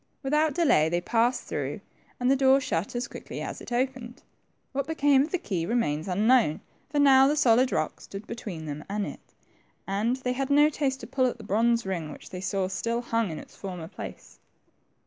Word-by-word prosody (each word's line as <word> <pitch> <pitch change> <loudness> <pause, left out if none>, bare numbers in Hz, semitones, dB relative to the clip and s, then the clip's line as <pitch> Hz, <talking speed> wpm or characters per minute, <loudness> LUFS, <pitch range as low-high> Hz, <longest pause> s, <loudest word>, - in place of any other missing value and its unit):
Without 300 +2 +2
delay 275 - +4
they 175 +1 +1
passed 235 +6 +1
through, - - -4 0.4
and 250 +1 +2
the - - +5
door 270 0 +5
shut 195 -5 -2
as 240 - -2
quickly - - -8
as - - -5
it - - -10
opened. 250 +1 -2 0.5
What 275 0 -2
became 290 -4 +3
of 295 - -1
the 365 - +1
key 185 - -3
remains 165 -7 0
unknown, 210 -2 +3 0.3
for 295 - -3
now 270 -2 +7
the 295 - +2
solid 255 -2 +4
rock - - -1
stood 200 +2 -9
between 180 -9 -6
them 150 0 -5
and 205 0 -1
it, - - -10 0.5
and 210 +5 0
they 255 -1 -2
had 270 +1 -2
no 295 +1 +6
taste 275 -3 -2
to - - -6
pull 260 -2 +1
at 245 - -3
the 225 - -11
bronze 230 +3 +2
ring 170 -5 -3
which - - -12
they 180 -1 -6
saw 190 0 -1
still 230 +5 -2
hung 230 -3 0
in 160 - -5
its - - -11
former 180 -4 -6
place. - - -10
235 Hz, 205 wpm, -27 LUFS, 195-270 Hz, 0.5 s, now